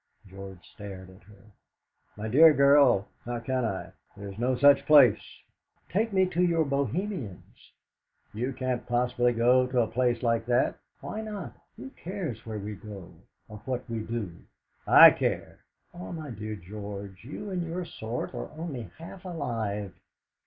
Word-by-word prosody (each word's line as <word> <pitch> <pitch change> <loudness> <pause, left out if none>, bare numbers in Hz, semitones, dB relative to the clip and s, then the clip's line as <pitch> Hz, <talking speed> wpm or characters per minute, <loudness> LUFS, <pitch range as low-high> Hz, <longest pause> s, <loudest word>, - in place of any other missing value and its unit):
George 95 -1 -11
stared 95 -3 -9
at 95 - -18
her. 105 +1 -19 0.7
"My 105 +1 -4
dear 155 +7 +7
girl, 140 -7 +5 0.2
how 120 0 -4
can 130 +2 -2
I? 95 -5 -3 0.3
There 100 0 -7
is 100 +2 -10
no 125 +2 +1
such 140 +2 +5
place!" 140 -8 +7 0.7
"Take 220 +4 0
me 190 -1 +3
to 175 0 -1
your 170 -3 +2
Bohemians!" 140 - -4 0.6
"You 120 +5 -2
can't 130 -2 -3
possibly 125 0 +1
go 125 +2 +3
to 125 -1 +1
a 115 - +1
place 120 0 0
like 115 -1 +1
that." 125 +1 +1 0.2
"Why 215 - -5
not? 205 - -6 0.2
Who 130 +2 -9
cares 170 - -6
where 110 -1 -4
we 105 +1 -5
go, 100 -5 -10 0.3
or 105 - -10
what 130 -1 -3
we 115 -2 -3
do?" 110 -5 -4 0.5
"I - - +10
care!" - - -3 0.3
"Ah, 175 +1 -8
my 155 -5 -6
dear 110 -1 -5
George, 100 0 -8
you 195 - -7
and 180 -2 -2
your 170 +2 -4
sort 115 -6 -5
are - - -5
only 140 - -6
half 170 +3 -11
alive!" 115 - -3
120 Hz, 160 wpm, -28 LUFS, 105-145 Hz, 0.7 s, I